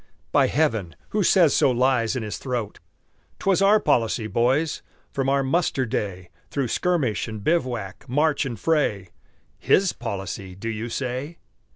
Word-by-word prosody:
By - - +4
heaven, 115 - 0
who 210 - 0
says 175 -5 +4
so - - +4
lies 125 -1 +2
in 125 - -2
his 105 - -5
throat! 120 -5 -4 0.6
'Twas 195 -1 +1
our 205 +2 +6
policy, 115 - +1
boys, 125 +9 +1 0.3
from 135 -1 -1
our 140 0 +2
muster 135 -2 +1
day, 95 -5 -4 0.2
Through 135 -4 -2
skirmish 150 -13 0
and 110 -2 -7
bivouac, 120 - -1
march 150 +3 +2
and 120 -6 -5
fray 120 - 0 0.5
"His 190 -1 +3
policy," 95 -3 -5
do 115 +4 -5
you 115 +1 -4
say? 130 +6 -4
125 Hz, 150 wpm, -24 LUFS, 110-150 Hz, 0.6 s, our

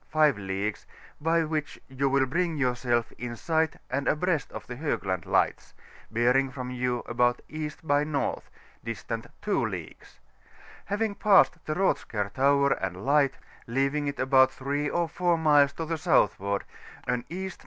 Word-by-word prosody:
5 155 -2 +4
leagues, 100 +2 -3 0.3
by 165 +2 +2
which 155 -1 -3
you 135 +1 0
will 135 0 +3
bring 170 +4 -1
yourself 125 -3 0
in 120 -1 -4
si^ht 160 +5 0
and 135 +2 -1
abreast 155 -2 0
of - - -8
the 125 - -7
Hoo^and 95 - -2
Lights, - - 0 0.3
bearing 125 +4 +2
from 125 -1 -6
you 125 -1 -1
about 120 +1 +1
E. 155 0 -4
by 145 -2 +2
N., 150 -2 -1 0.4
distant 115 0 -5 0.2
2 - - +1
leagues; - - -7 0.7
having 210 +1 -1
passed 200 -5 +4
the 155 - -1
Rothskar 105 - 0
Tower 140 +1 +3
and 95 -1 -2
Light, 140 -1 +3 0.3
leaving 135 +4 0
it 140 - -4
about 130 0 +5
3 140 +2 -2
or 175 -1 0
4 175 +1 +1
miles 145 -3 +5
to 165 - -4
the 165 0 -3
southward, 100 - +2 0.4
an 125 -1 -1
E.N. 190 +2 -4
140 Hz, 155 wpm, -27 LUFS, 120-155 Hz, 0.7 s, about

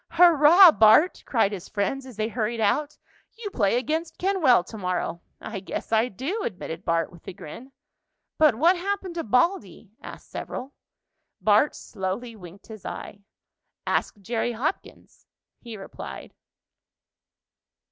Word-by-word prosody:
"Hurrah, 340 +1 +8
Bart!" 225 - +5
cried 225 -5 +2
his 195 -3 -7
friends, 255 +6 -2
as 250 - -11
they 215 0 0
hurried 230 0 -2
out. 285 +8 0 0.4
"You 430 -3 -6
play 215 - +1
against 315 +6 -3
Kenwell 340 - +3
to 220 - -11
morrow." 180 -2 -3 0.2
"I 215 -3 -6
guess 190 - -6
I 225 +2 +3
do," 275 - -4
admitted 180 -4 -6
Bart 165 -1 0
with 175 -2 -17
a 195 - -6
grin. 235 - -11 0.7
"But 305 -6 +5
what 335 +10 +4
happened 385 0 -3
to 335 - -3
Baldy?" 225 - 0
asked - - -11
several. 265 +3 -6 0.7
Bart 215 +7 +3
slowly 215 +4 -5
winked 185 -1 -13
his 215 -4 -11
eye. 200 - -7 0.7
"Ask - - -1
Jerry 230 +4 -2
Hopkins," 285 - -5 0.3
he 230 -3 -9
replied. 195 - -9
235 Hz, 135 wpm, -25 LUFS, 200-310 Hz, 0.7 s, Hurrah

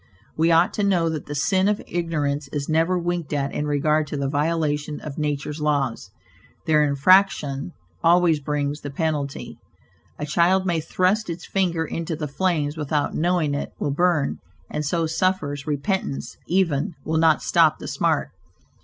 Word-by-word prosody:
We 165 +2 +2
ought 165 +2 +4
to 205 - -1
know 180 -4 +2
that 155 -2 -4
the 145 - -5
"sin 185 +6 +2
of 210 0 +1
ignorance" 150 -4 -2
is 140 0 -4
never 165 +3 +2
winked 175 -3 -2
at 140 -1 -1
in 150 - -2
regard 150 +1 +1
to 145 - -4
the 140 -1 -1
violation 150 0 -1
of 150 -1 -7
nature's 150 0 -2
laws; 145 -5 -1 0.6
their 155 -1 +4
infraction 150 0 +3 0.3
always 170 -2 +4
brings 145 0 -2
the 145 - -5
penalty. 145 -1 -3 0.6
A 150 - -3
child 175 +5 +2
may 170 -3 +1
thrust 185 +6 0
its 170 +1 -5
finger 175 -4 0
into 165 +1 -4
the 150 -1 -4
flames 155 -1 -1
without 150 -1 -1
knowing 170 -3 +1
it 145 - -4
will 145 - -1
burn, 165 -1 +1 0.3
and 150 - -2
so 165 +3 0
suffers, 160 -4 -1
repentance, 150 +1 -2
even, 170 -2 +1
will 160 0 0
not 160 -2 +4
stop - - +4
the - - -8
smart. - - 0
155 Hz, 160 wpm, -23 LUFS, 145-175 Hz, 0.6 s, ought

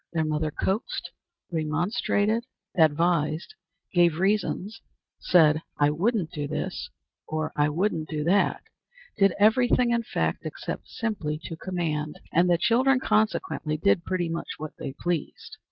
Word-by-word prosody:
Their 160 -1 +1
mother 155 0 0
coaxed, 195 - -2 0.4
remonstrated, 200 +8 0 0.3
advised, 160 - +2 0.4
gave 175 -3 +4
reasons, 205 +2 0 0.4
said 155 -3 +4 0.2
"I 145 0 +3
wouldn't 180 +1 0
do 150 -4 -3
this," - - -4 0.4
or 155 0 -2
"I 150 0 +3
wouldn't 165 0 -1
do 150 -2 -2
that," 185 +6 +2 0.5
did 195 -2 +4
every 220 +4 +5
thing, 245 -1 +3
in 235 0 +2
fact, 80 - -2
except - - -6
simply 175 -10 -3
to 165 - -6
command; 160 -4 -3
and 175 +2 +4
the 175 - +4
children, 245 +7 +3
consequently, 215 - 0
did 170 +1 +2
pretty 180 -1 -1
much 165 0 -4
what 155 0 -6
they 135 - -5
pleased. 175 -2 -3
170 Hz, 135 wpm, -26 LUFS, 155-210 Hz, 0.5 s, every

